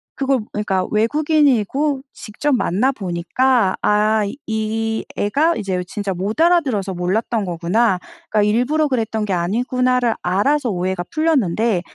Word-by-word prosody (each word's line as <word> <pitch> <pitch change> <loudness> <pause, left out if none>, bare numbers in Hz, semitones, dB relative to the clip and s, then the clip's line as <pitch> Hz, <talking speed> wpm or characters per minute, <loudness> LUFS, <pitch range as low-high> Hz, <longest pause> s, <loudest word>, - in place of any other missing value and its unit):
그거 270 -1 +1
그니까 195 -3 -1
외국인이고 280 +2 +1
직접 280 +7 -3
만나 240 +3 +1
보니까 195 +2 0
'아 215 +1 +2 0.3
이 220 0 -2
애가 295 +11 +1
이제 190 -4 -2
진짜 205 -3 -3
못 195 - -4
알아들어서 270 - +2
몰랐던 200 +5 -1
거구나.' 180 +3 +1 0.3
그러니까 210 -1 +2
'일부러 250 +9 +2
그랬던 225 -4 -1
게 200 - -2
아니구나.'를 245 +6 +1
알아서 240 +10 +1
오해가 185 -1 -2
풀렸는데 235 - +1
220 Hz, 315 characters per minute, -19 LUFS, 195-260 Hz, 0.3 s, 아